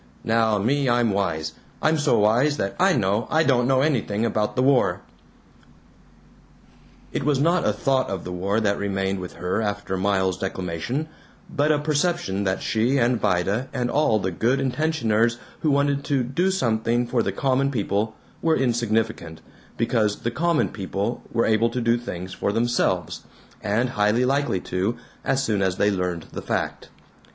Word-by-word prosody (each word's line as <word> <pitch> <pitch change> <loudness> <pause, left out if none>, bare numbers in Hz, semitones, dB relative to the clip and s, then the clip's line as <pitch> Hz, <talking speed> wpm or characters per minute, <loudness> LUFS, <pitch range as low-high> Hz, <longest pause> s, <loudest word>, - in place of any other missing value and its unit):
Now 110 -1 +2
me, 130 +6 +1
I'm 120 -2 +2
wise. 80 -6 -1 0.3
I'm 155 0 +2
so 145 - +3
wise 120 +8 +3
that 95 -5 -2
I 190 +1 +4
know 105 - 0
I 160 +1 +3
don't 125 -5 +2
know 130 0 +3
anything 115 -7 0
about 105 -2 -1
the 125 - +2
war." 135 -1 +3 2.1
It - - -2
was 145 -2 +1
not 170 +4 +2
a - - +4
thought 135 -1 0
of 95 -3 -4
the 90 - -6
war 95 +4 0
that 100 -2 0
remained 95 -1 -1
with 90 -1 -7
her 90 +5 -2
after 100 -2 -2
Miles's 95 -1 0
declamation 95 - -3 0.5
but 150 0 +3
a 150 - +3
perception 145 - 0
that 95 0 -1
she 120 +5 +1
and 120 -1 +2
Vida 100 +5 0
and 120 -1 -2
all 150 -6 +2
of 105 - 0
the 95 - -1
good 120 +9 +1
intentioners 125 -5 +1 0.2
who 155 - 0
wanted 140 0 +1
to 135 -3 +1
"do 140 +10 0
something 120 -8 +1
for 120 0 0
the 100 - -1
common 135 +6 +1
people" 110 -3 -1 0.3
were 160 -1 +2
insignificant, 115 -9 -1 0.4
because 110 -3 0
the 115 - -1
"common 165 +5 +1
people" 100 +3 -3
were 115 - +1
able 110 +1 +3
to 120 +2 -3
do 115 -1 +2
things 95 -6 -6
for - - -1
themselves, 120 +3 0 0.4
and 115 +5 0
highly 105 +2 +2
likely 135 -6 +1
to, 95 +6 -2 0.3
as 135 0 +1
soon 105 -6 0
as 95 -2 0
they 105 +1 +3
learned 90 -3 -2
the - - -6
fact. - - -3
115 Hz, 170 wpm, -23 LUFS, 100-135 Hz, 2.1 s, I